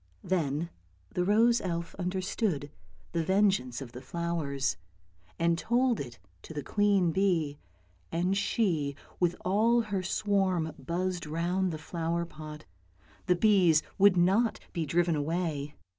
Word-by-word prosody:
" -, -, -36 dB
Then 160 Hz, -1 st, -1 dB, 0.4 s
the 180 Hz, -, +1 dB
rose 230 Hz, +5 st, +4 dB
elf 170 Hz, -2 st, -3 dB
understood 180 Hz, -4 st, -2 dB, 0.4 s
the 165 Hz, -1 st, 0 dB
vengeance 190 Hz, -, +2 dB
of 125 Hz, -3 st, -7 dB
the 125 Hz, -, -9 dB
flowers, 145 Hz, -, -2 dB, 0.6 s
and 170 Hz, 0 st, +2 dB
told 240 Hz, +2 st, +2 dB
it 120 Hz, -3 st, -6 dB, 0.2 s
to 160 Hz, -, -10 dB
the 145 Hz, -, -3 dB
queen 200 Hz, -3 st, +2 dB
bee, 165 Hz, -6 st, +1 dB, 0.5 s
and 180 Hz, +3 st, +1 dB
she 180 Hz, -8 st, 0 dB, 0.2 s
with 175 Hz, -1 st, +2 dB
all 225 Hz, +6 st, +3 dB
her 205 Hz, -4 st, -2 dB
swarm 185 Hz, -4 st, 0 dB
buzzed 180 Hz, 0 st, -2 dB
round 175 Hz, +4 st, 0 dB
the 155 Hz, -, -4 dB
flower 170 Hz, +1 st, -2 dB
pot; 155 Hz, -1 st, -10 dB, 0.6 s
the 180 Hz, -, +4 dB
bees 175 Hz, -5 st, +4 dB, 0.2 s
would 195 Hz, -1 st, +6 dB
not 195 Hz, +7 st, +3 dB
be 165 Hz, -4 st, -2 dB
driven 170 Hz, +2 st, +2 dB
away. 150 Hz, -1 st, -2 dB
175 Hz, 135 wpm, -30 LUFS, 155-195 Hz, 0.6 s, would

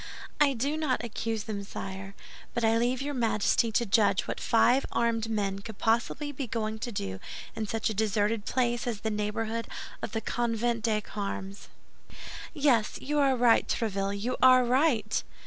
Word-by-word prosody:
"I 290 Hz, -2 st, +5 dB
do 280 Hz, +5 st, -1 dB
not 275 Hz, -6 st, 0 dB
accuse 225 Hz, -1 st, -3 dB
them, 205 Hz, -2 st, -4 dB
sire; 195 Hz, 0 st, -7 dB, 0.4 s
but 235 Hz, -, 0 dB
I 225 Hz, 0 st, +4 dB
leave 250 Hz, +3 st, 0 dB
your 290 Hz, +1 st, -3 dB
Majesty 230 Hz, -1 st, +2 dB
to 235 Hz, -, +2 dB
judge 200 Hz, -2 st, +3 dB
what -, -, -3 dB
five 245 Hz, +3 st, +4 dB
armed 230 Hz, -1 st, 0 dB
men 200 Hz, -3 st, -1 dB
could 210 Hz, 0 st, -9 dB
possibly 235 Hz, +6 st, 0 dB
be 275 Hz, -2 st, -5 dB
going 220 Hz, -1 st, -2 dB
to 240 Hz, -, -4 dB
do 95 Hz, -, -4 dB, 0.4 s
in 220 Hz, -, -3 dB
such 225 Hz, +1 st, -1 dB
a 220 Hz, -, 0 dB
deserted 210 Hz, +1 st, +1 dB
place 240 Hz, -1 st, 0 dB
as 220 Hz, -4 st, -3 dB
the 220 Hz, -, -1 dB
neighborhood 215 Hz, +2 st, -2 dB, 0.3 s
of -, -, -5 dB
the 225 Hz, -, 0 dB
Convent 235 Hz, 0 st, -1 dB
des 215 Hz, -1 st, +1 dB
Carmes." 200 Hz, -1 st, -5 dB, 0.8 s
"Yes, 275 Hz, -8 st, +2 dB
you 295 Hz, +2 st, -1 dB
are 275 Hz, -2 st, +4 dB
right, 240 Hz, -2 st, +4 dB
Tréville, 200 Hz, -2 st, -1 dB
you 245 Hz, +5 st, -2 dB
are 255 Hz, -1 st, +7 dB
right!" 245 Hz, -4 st, +2 dB
225 Hz, 170 wpm, -29 LUFS, 210-245 Hz, 0.8 s, are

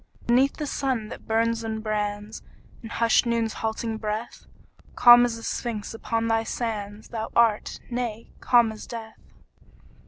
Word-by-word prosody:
Beneath 255 Hz, +4 st, +3 dB
the 300 Hz, -, -3 dB
sun 260 Hz, -6 st, -2 dB
that -, -, -10 dB
burns 230 Hz, +1 st, +1 dB
and 220 Hz, -1 st, -4 dB
brands 210 Hz, 0 st, -3 dB, 0.4 s
In 225 Hz, -, -9 dB
hushed 230 Hz, +1 st, +2 dB
Noon's 230 Hz, -1 st, 0 dB
halting 225 Hz, 0 st, -2 dB
breath, 215 Hz, +2 st, -5 dB, 0.5 s
Calm 240 Hz, 0 st, +8 dB
as 240 Hz, -1 st, -2 dB
the 230 Hz, -, -10 dB
Sphinx 230 Hz, -4 st, -4 dB
upon 230 Hz, 0 st, -2 dB
thy 225 Hz, 0 st, +2 dB
sands 215 Hz, -3 st, -4 dB
Thou 220 Hz, -2 st, -4 dB
art 230 Hz, -3 st, +2 dB
nay, 235 Hz, -2 st, -4 dB
calm 240 Hz, -2 st, +4 dB
as 215 Hz, -, -10 dB
death. 225 Hz, -2 st, -8 dB
225 Hz, 150 wpm, -25 LUFS, 220-235 Hz, 0.5 s, Calm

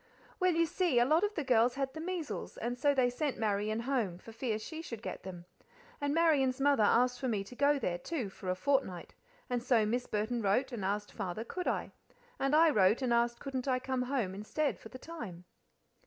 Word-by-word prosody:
"Well, 365 Hz, -1 st, +3 dB
you 335 Hz, 0 st, +4 dB
see, 340 Hz, -4 st, +1 dB
a 240 Hz, -, +6 dB
lot 310 Hz, +7 st, +3 dB
of 415 Hz, 0 st, 0 dB
the 310 Hz, -, -1 dB
girls 245 Hz, -1 st, +3 dB
had 270 Hz, -1 st, -2 dB
the 315 Hz, -, -6 dB
measles, 345 Hz, -3 st, -4 dB
and 240 Hz, +2 st, -2 dB
so 285 Hz, +3 st, +2 dB
they 250 Hz, -2 st, +3 dB
sent 285 Hz, +2 st, -2 dB
Marian 215 Hz, +1 st, 0 dB
home, 235 Hz, -9 st, -1 dB
for 225 Hz, -, -12 dB
fear 225 Hz, -1 st, -2 dB
she 315 Hz, +9 st, -7 dB
should 230 Hz, -8 st, -8 dB
get -, -, -5 dB
them. 180 Hz, -2 st, -8 dB, 0.6 s
And 285 Hz, 0 st, 0 dB
Marian's 290 Hz, -5 st, +3 dB
mother 280 Hz, -3 st, +3 dB
asked 245 Hz, +4 st, +3 dB
for 260 Hz, -, -2 dB
me 210 Hz, -5 st, 0 dB
to 225 Hz, +5 st, -12 dB
go 285 Hz, +2 st, +3 dB
there, 175 Hz, -9 st, -2 dB
too, 255 Hz, -, -3 dB
for 185 Hz, -, -7 dB
a 185 Hz, -, +1 dB
fortnight; 265 Hz, -7 st, -1 dB, 0.3 s
and 245 Hz, -1 st, -1 dB
so 235 Hz, -3 st, +3 dB
Miss 245 Hz, +4 st, -1 dB
Burton 220 Hz, +3 st, -1 dB
wrote 215 Hz, +7 st, +1 dB
and 230 Hz, -5 st, -4 dB
asked 205 Hz, +2 st, -2 dB
Father 195 Hz, +1 st, -4 dB
could 360 Hz, +9 st, -5 dB
I? -, -, -1 dB, 0.5 s
and 275 Hz, +2 st, +2 dB
I 325 Hz, 0 st, +6 dB
wrote 210 Hz, +1 st, +3 dB
and 245 Hz, -2 st, +2 dB
asked 235 Hz, 0 st, +2 dB
couldn't 265 Hz, -1 st, -4 dB
I 255 Hz, -1 st, +2 dB
come 255 Hz, 0 st, -2 dB
home 250 Hz, -7 st, -1 dB
instead 215 Hz, +9 st, -2 dB
for -, -, -11 dB
the 255 Hz, -, -9 dB
time?" 225 Hz, -, -8 dB
250 Hz, 220 wpm, -32 LUFS, 215-285 Hz, 0.6 s, a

